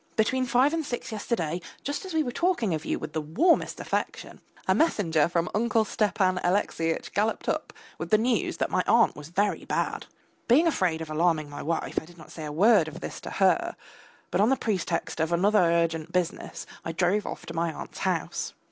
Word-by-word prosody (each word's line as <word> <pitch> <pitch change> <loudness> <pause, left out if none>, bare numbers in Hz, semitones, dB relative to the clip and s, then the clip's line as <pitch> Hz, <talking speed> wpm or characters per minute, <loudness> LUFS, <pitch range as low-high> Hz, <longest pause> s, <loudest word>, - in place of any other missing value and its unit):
Between 255 +4 +1
five 255 +5 +3
and 330 -1 0
six 240 -5 -5
yesterday, 180 -6 -2 0.2
just 285 +7 -3
as 375 - -6
we 315 - +3
were 245 - -3
talking 330 - +1
of 155 0 -3
you - - -1
with - - -7
the 155 - -1
warmest 250 - +2
affection, - - -3 0.3
a - - +5
messenger 170 - +2
from 170 0 0
Uncle 225 0 +2
Stepan 190 -3 +1
Alexeyitch 175 -3 0
galloped 215 +3 0
up - - -1 0.3
with - - -4
the 215 - +5
news 235 +2 0
that - - -1
my - - +2
aunt 235 0 +4
was 150 +1 -10
very 200 +4 0
bad. - - -2 0.4
Being 270 +8 +5
afraid 185 - +1
of 160 -1 -6
alarming 155 -2 +1
my 145 - -6
wife, 165 +2 -1
I - - -13
did 175 +1 -16
not 155 - -13
say 155 - -7
a 150 - -5
word 195 +2 +5
of 155 - -8
this - - -7
to - - -6
her, - - +2 0.6
but 180 - +2
on 215 - +4
the 270 - +3
pretext 180 -8 -2
of 160 +1 0
other 200 +5 +3
urgent 170 -1 +1
business 180 -2 -2 0.2
I 165 - -4
drove 190 +5 +1
off - - -6
to 165 - -7
my 165 0 0
aunt's - - -8
house. - - -2
185 Hz, 205 wpm, -27 LUFS, 165-230 Hz, 0.6 s, a